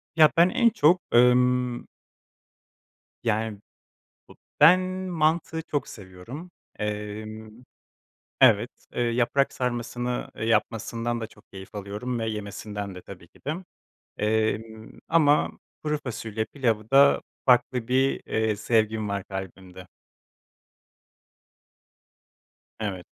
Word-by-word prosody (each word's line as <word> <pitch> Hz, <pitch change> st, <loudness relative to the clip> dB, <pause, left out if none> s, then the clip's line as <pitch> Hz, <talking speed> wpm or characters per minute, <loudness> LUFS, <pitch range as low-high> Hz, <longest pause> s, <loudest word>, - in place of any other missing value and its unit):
Ya 155 Hz, -2 st, +7 dB
ben 175 Hz, +2 st, +6 dB
en 235 Hz, -2 st, +4 dB
çok, 180 Hz, -5 st, +3 dB
ımm 125 Hz, 0 st, +3 dB, 1.4 s
yani 110 Hz, -2 st, -1 dB, 0.7 s
bu -, -, -14 dB, 0.2 s
ben 165 Hz, +5 st, +8 dB, 0.3 s
mantı 160 Hz, 0 st, 0 dB
çok 145 Hz, -2 st, -2 dB
seviyorum. 105 Hz, -, -10 dB, 0.3 s
Emm, 105 Hz, +1 st, -5 dB, 0.9 s
evet, 110 Hz, +3 st, +5 dB, 0.2 s
ııı, 120 Hz, -, +1 dB
yaprak 125 Hz, +3 st, +1 dB
sarmasını 120 Hz, 0 st, -3 dB
yapmasından 115 Hz, +1 st, -1 dB
da 110 Hz, -, -4 dB
çok 105 Hz, -1 st, -22 dB
keyif 95 Hz, +1 st, -11 dB
alıyorum 105 Hz, +5 st, -4 dB
ve 115 Hz, -, -2 dB
yemesinden 105 Hz, -1 st, -6 dB
de 90 Hz, -, -9 dB
tabii 90 Hz, -3 st, -12 dB
ki -, -, -23 dB
de. 150 Hz, -, 0 dB, 0.6 s
Emm, 110 Hz, +1 st, -2 dB
ama 150 Hz, -3 st, +4 dB, 0.3 s
kuru 150 Hz, 0 st, 0 dB
fasulye 110 Hz, -3 st, -4 dB
pilavı 115 Hz, -5 st, -2 dB
da 140 Hz, +1 st, +6 dB, 0.2 s
farklı 125 Hz, -1 st, +3 dB
bir, 130 Hz, +2 st, +2 dB
eee, 110 Hz, -1 st, 0 dB
sevgim 110 Hz, 0 st, 0 dB
var 100 Hz, -1 st, -2 dB
kalbimde. 95 Hz, -1 st, -8 dB, 2.9 s
Evet. 95 Hz, -5 st, -4 dB
115 Hz, 105 wpm, -26 LUFS, 105-130 Hz, 2.9 s, ben